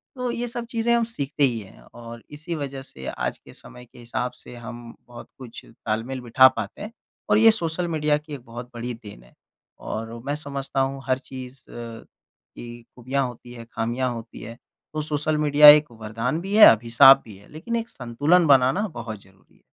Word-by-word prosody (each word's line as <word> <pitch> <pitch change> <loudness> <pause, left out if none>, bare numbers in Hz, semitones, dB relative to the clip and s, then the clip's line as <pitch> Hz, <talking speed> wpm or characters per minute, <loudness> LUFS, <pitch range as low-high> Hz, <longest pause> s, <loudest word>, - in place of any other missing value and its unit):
तो 250 -1 -3
ये 240 +1 -3
सब 240 0 -6
चीज़ें 235 0 0
हम 235 0 +2
सीखते 145 - -2
ही 120 -4 +2
हैं, 100 -3 -14
और 115 -1 -11
इसी 155 +4 -6
वज़ह 140 -3 -5
से 65 - -12
आज - - -3
के - - -17
समय 125 0 -13
के 120 - -19
हिसाब 120 +1 -4
से - - -11
हम 120 0 -10
बहुत 120 -1 -12
कुछ 125 -3 -11
तालमेल 115 +3 -5
बिठा 125 +2 +6
पाते 105 -3 -6
हैं। 210 +2 -7 0.4
और 210 - +4
ये 225 +1 +7
सोशल 175 -4 -2
मीडिया 150 -2 +1
की 150 0 -11
एक 140 - -7
बहुत 120 +1 -9
बड़ी 120 +1 -5
देन 105 - -13
है। - - -22 0.5
और 115 +1 -6
मैं 145 - -2
समझता 140 -2 -5
हूँ 135 0 -2
हर 130 0 +2
चीज़ 130 0 -10
अ, - - -13
की 120 0 -12
खूबियाँ 130 +2 -2
होती 120 0 -11
हैं, 115 -1 -10
खामियाँ 120 +3 -2
होती 115 -1 -10
हैं। 115 +1 -9 0.4
तो 155 - -2
सोशल 150 0 -1
मीडिया 150 0 +6
एक 150 -2 +6
वरदान 115 +6 -4
भी 195 +3 -4
है 215 - +10
अभिशाप 120 +4 +6
भी 110 -3 -12
है, 100 - -19
लेकिन 165 +10 -5
एक 230 0 -3
संतुलन 145 +8 +1
बनाना 140 +9 +4
बहुत 115 - -8
ज़रूरी 95 0 -26
है। - - -29
130 Hz, 200 wpm, -23 LUFS, 115-150 Hz, 0.5 s, है